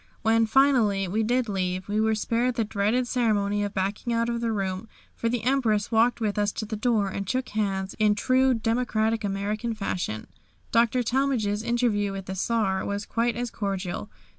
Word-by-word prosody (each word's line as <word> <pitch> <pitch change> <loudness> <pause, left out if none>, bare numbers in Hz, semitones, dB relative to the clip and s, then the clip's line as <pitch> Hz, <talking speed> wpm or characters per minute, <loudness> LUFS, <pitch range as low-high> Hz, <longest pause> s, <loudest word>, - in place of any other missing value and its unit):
When, 225 0 +3
finally, 220 -6 +3
we 210 +5 0
did 245 +2 +1
leave 185 -2 -2
we 210 +1 0
were 220 0 +2
spared 235 +3 0
the 230 - +1
dreaded 215 +4 0
ceremony 205 -5 +1
of 205 0 -4
backing 200 +5 -2
out 230 0 +1
of 235 0 -2
the 230 -1 0
room, 195 0 -2 0.3
for 230 - -2
the 240 -1 -2
Empress 235 -5 +1
walked 230 +2 +3
with 210 -2 -1
us 205 0 +1
to 215 - -4
the 215 - -4
door, 215 -2 +1
and 195 0 -4
shook 255 0 -1
hands 195 -2 -2
in 210 -1 +4
true 255 +3 +3
democratic 225 -1 0
American 210 +3 -2
fashion. 180 - -3 0.5
Dr. 235 +2 +3
Talmage's 240 -5 0
interview 230 -4 0
with 195 -1 -6
the 190 - -5
Czar 195 -1 0
was 200 +1 -3
quite 235 0 0
as 240 0 -3
cordial. 195 - -3
220 Hz, 185 wpm, -26 LUFS, 200-235 Hz, 0.5 s, in